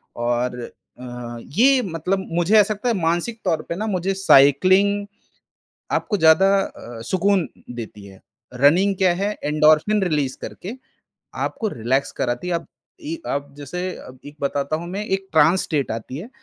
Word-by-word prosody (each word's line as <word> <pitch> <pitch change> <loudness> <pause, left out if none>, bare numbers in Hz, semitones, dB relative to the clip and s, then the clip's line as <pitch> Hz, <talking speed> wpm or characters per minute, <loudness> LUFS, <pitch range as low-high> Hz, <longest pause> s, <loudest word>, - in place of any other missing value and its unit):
और 120 +1 -1 0.4
अ, 120 -1 -7
ये 255 - +3
मतलब 180 +3 -2
मुझे 175 +5 +2
ऐसा 210 +1 +3
लगता 210 +4 -3
है - - +2
मानसिक 175 +8 -1
तौर 160 -4 +1
पे 170 - -2
ना 215 +4 -3
मुझे 190 -1 -1
साइकिलिंग 190 +4 +4 0.9
आपको 210 - 0
ज़्यादा 160 +2 +5 0.6
सुकून 190 -1 +2 0.3
देती 110 -3 -8
है। 95 -1 -15 0.3
रनिंग 170 +10 +4
क्या 185 -2 +3
है 205 - 0
एंडोर्फिन 155 +7 +3
रिलीज़ 150 -7 0
करके 195 +5 -7 0.7
आपको 225 - -2
रिलैक्स 130 +4 -1
कराती 120 +8 -2
है। 180 - -1
अब 170 - -4 0.4
इ 315 +1 -4 0.2
अब 140 0 -5
जैसे 145 +5 -6 0.4
एक 145 +1 -10
बताता 140 +1 -1
हूँ 170 +2 -6
मैं 200 +3 -4
एक 195 -1 -2
ट्रांस 165 +4 +4
स्टेट 145 -4 -1
आती 115 +4 -6
है, 190 +10 -8
165 Hz, 155 wpm, -21 LUFS, 140-195 Hz, 0.9 s, ज़्यादा